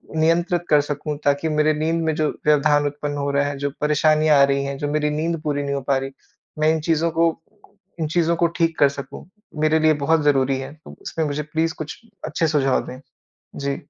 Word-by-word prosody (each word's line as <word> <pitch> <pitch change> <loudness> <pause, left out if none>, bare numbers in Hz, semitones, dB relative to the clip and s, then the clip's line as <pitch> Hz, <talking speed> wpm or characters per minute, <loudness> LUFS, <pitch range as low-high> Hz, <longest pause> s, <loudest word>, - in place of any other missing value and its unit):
नियंत्रित 170 +2 +2
कर 150 -1 +5
सकूँ 145 +1 -4
ताकि 145 +3 +1
मेरे 155 0 +2
नींद 165 +2 0
में 160 -1 0
जो 155 -1 +1 0.2
व्यवधान 145 0 +3
उत्पन्न 145 0 -4
हो 140 0 -1
रहा 140 0 +1
है, 145 -1 -4
जो 140 +1 -2
परेशानियाँ 155 0 +3
आ - - +7
रही 140 0 +2
हैं, 140 0 -4
जो 145 - -3
मेरी 150 0 0
नींद 160 +2 -2
पूरी 145 -2 -1
नहीं 140 0 -2
हो 140 - -2
पा 135 - +4
रही, 135 0 -4 0.5
मैं 155 - +3
इन 160 - -1
चीज़ों 165 +1 +1
को 165 +1 +3 0.7
इन 160 - -1
चीज़ों 170 +1 +1
को 170 0 +2
ठीक 165 -1 +1
कर 140 - +6
सकूँ। 140 0 -9 0.4
मेरे 155 +1 +3
लिए 155 0 +4
बहुत 160 +2 +3
ज़रूरी 135 -2 +2
है। 135 +2 -7
तो 155 - -15
उसमें 160 - -3
मुझे 150 0 -2
प्लीज़ 160 +2 -1
कुछ 155 -1 -7 0.3
अच्छे 160 +1 0
सुझाव 140 -4 +1
दें। 130 - -8 0.6
जी। 140 0 -2
150 Hz, 215 wpm, -21 LUFS, 140-160 Hz, 0.7 s, आ